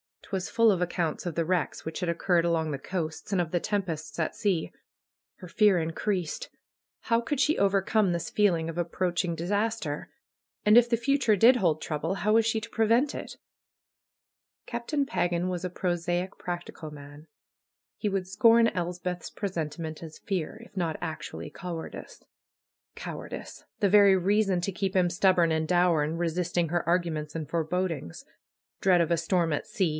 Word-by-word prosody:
Twas 190 -2 -4
full 230 -1 +4
of 185 -3 0
accounts 175 -2 -1
of 175 -3 -3
the 170 - +1
wrecks 175 -1 -1
which 160 - -5
had 180 - -2
occurred 170 0 +2
along 165 -2 +1
the 140 - -3
coasts, 160 -2 -4
and 185 - +3
of 165 -2 -4
the 175 - +1
tempests 170 -6 -3
at 160 - -1
sea. 185 -6 -1 0.6
Her 180 - -11
fear 210 -1 +4
increased. 170 +1 -2 0.5
How 230 0 +2
could 250 +4 -2
she 305 - +3
overcome 195 0 +2
this 170 -2 -2
feeling 170 -6 +2
of 165 - -6
approaching 175 0 -1
disaster? 200 -2 -2 0.6
And 210 +2 +7
if 240 0 +6
the 235 - +3
future 240 -1 +2
did 235 +6 +6
hold 160 -7 +1
trouble, 160 +4 -2
how 210 +2 +1
was 225 0 +4
she 225 -1 +1
to 230 - -8
prevent 230 +6 +2
it? - - -7 1.3
Captain 270 +4 -2
Pagan 175 -6 0
was 180 0 -3
a - - -2
prosaic, 175 +1 -2
practical 175 -3 -6
man. 145 +1 -12 0.7
He 215 - -2
would 195 -2 -1
scorn 230 +4 +5
Elspeth's 180 0 -4
presentiment 160 -4 -4
as 160 -2 -9
fear; 195 +3 -4
if - - -20
not 165 -4 -1
actually 155 -2 -5
cowardice. 170 -1 -7 0.7
Cowardice! - - -7 0.2
The 200 - +4
very 200 -1 +7
reason 195 0 +2
to 195 - -1
keep 195 +1 -2
him 180 -2 +4
stubborn 175 -2 +3
and 160 0 0
dour 175 -3 +3
in 160 +2 -3
resisting 175 0 0
her 175 +1 -1
arguments 165 -3 0
and 155 -2 -4
forebodings. 165 - -2 0.6
Dread 180 -3 +4
of 170 - 0
a 170 - +3
storm 165 0 +1
at 145 - -2
sea 185 -4 0
180 Hz, 170 wpm, -28 LUFS, 165-200 Hz, 1.3 s, And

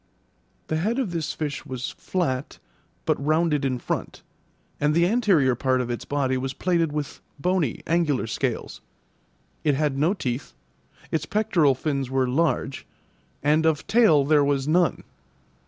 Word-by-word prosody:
The 155 - -1
head 215 +9 0
of 250 -9 -1
this 165 -3 -2
fish 150 -2 -4
was 130 -3 -5
flat, 140 -7 -3 0.5
but - - 0
rounded 155 -1 +2
in 130 -2 0
front, - - -4 0.6
and 150 +1 +2
the 170 +1 +4
anterior 185 - +3
part 130 +1 +1
of 125 -1 -2
its 120 - -4
body 135 -2 0
was 130 0 -4
plated 170 -4 +1
with 150 -1 -4 0.2
bony, 175 -4 0
angular 160 -7 +1
scales; 120 +1 -3 0.8
it 150 -3 +2
had 145 -1 0
no 165 +8 +2
teeth, 125 - -4 0.6
its 155 -1 -1
pectoral 170 -10 +2
fins 135 -1 -2
were 130 -1 +1
large, 140 0 0 0.6
and 150 +2 +3
of 160 -2 +1
tail 200 -10 +4
there 150 0 +4
was 140 -1 0
none. 175 +2 +2
150 Hz, 150 wpm, -24 LUFS, 135-170 Hz, 0.8 s, the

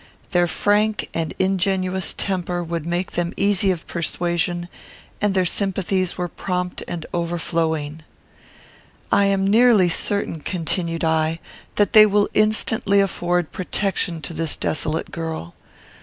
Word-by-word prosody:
Their 175 -2 +3
frank 210 +5 +1
and 165 -2 -3
ingenuous 190 -1 0
temper 180 -2 -2
would 170 -1 -4
make 175 +2 -2
them 175 0 -2
easy 200 -1 +2
of 175 -3 -2
persuasion, 175 +1 -1 0.5
and 205 -2 +1
their 185 -1 +3
sympathies 190 -1 0
were 180 - -2
prompt 180 +1 -3
and 170 -2 -5
overflowing. 165 -3 -2 1.1
"I 200 - +4
am 195 -1 +2
nearly 215 -3 +5
certain," 200 -1 -1
continued 165 +1 -2
I, 160 0 +1 0.4
"that 205 - +2
they 215 -1 +9
will 205 0 +2
instantly 215 -1 +3
afford 175 -3 0
protection 185 -3 -1
to 165 - -4
this 165 -2 -2
desolate 155 +1 -1
girl. 160 - -5
180 Hz, 125 wpm, -22 LUFS, 165-195 Hz, 1.1 s, they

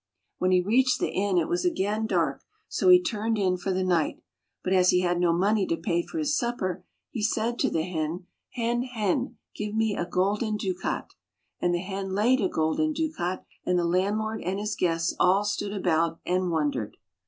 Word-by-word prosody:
When 185 - +2
he 180 -1 +4
reached 250 +7 +2
the - - -1
inn, 195 -1 0
it - - +2
was 350 +2 0
again 220 - 0
dark, - - 0 0.3
so - - +1
he 360 0 +9
turned 225 -9 -1
in 185 -3 +2
for 185 +2 -3
the 185 0 0
night. 175 -4 +1 0.4
But 185 - 0
as 180 -1 +5
he 180 - +4
had 175 -1 +1
no 175 -1 +3
money 195 +3 +2
to 165 - 0
pay 170 +1 0
for 325 - -8
his 300 -1 +1
supper, 190 -9 -2 0.3
he 230 - -4
said 225 +2 0
to - - +2
the 160 - 0
hen, 165 0 -3
" - - -56
Hen, 240 -1 0
hen, 245 0 -1 0.2
give 210 0 -4
me 220 -2 +1
a 175 - -2
golden 205 +4 0
ducat." 185 -3 -3 0.5
And 175 - +1
the 175 +1 -1
hen 190 0 -4
laid 240 +5 +3
a 190 - +1
golden 160 - 0
ducat, 290 - -2 0.2
and 180 - +1
the 175 - +1
landlord 210 +5 0
and 185 +3 -2
his 210 +1 -2
guests 165 -1 0
all 190 +3 +4
stood 205 0 -2
about 165 -4 0
and 180 0 0
wondered. 145 -9 -1
195 Hz, 200 wpm, -27 LUFS, 180-220 Hz, 0.5 s, he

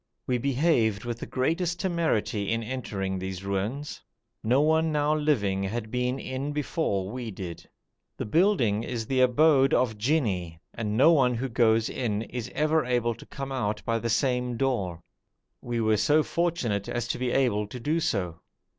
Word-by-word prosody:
We 125 -1 0
behaved 125 -6 +1
with 120 -1 -4
the - - -6
greatest 165 +6 -1
temerity 115 - 0
in 115 0 0
entering 100 -6 -3
these 95 0 -5
ruins; 105 +9 -3 0.4
no 120 +4 +3
one 160 +2 +3
now 150 0 +2
living 115 -11 +1
had 110 +3 -3
been 125 +1 0
in 135 +2 -4
before 115 - -1
we 125 -1 -5
did. 95 -4 -8 0.5
The - - -3
building 120 - +2
is 115 -1 -4
the 130 +2 +1
abode 135 +2 +4
of 110 -4 +1
jinni, 100 - 0
and 110 -2 -2
no 150 +7 +7
one 125 -5 +3
who 130 +3 -2
goes 115 -2 +3
in 110 -4 -2
is 120 0 -6
ever 155 +1 +2
able 120 -2 0
to 115 - -14
come 135 0 -6
out 110 -5 -2
by 115 0 0
the 115 - -3
same 125 -1 0
door. 100 -11 -1 0.6
We 120 -1 -3
were 110 -1 +2
so 145 +9 +3
fortunate 150 - -1
as 120 0 -2
to - - -2
be 125 0 0
able 120 -6 +1
to 125 +4 -8
do 155 +7 0
so. 95 - -1
120 Hz, 170 wpm, -27 LUFS, 105-140 Hz, 0.6 s, no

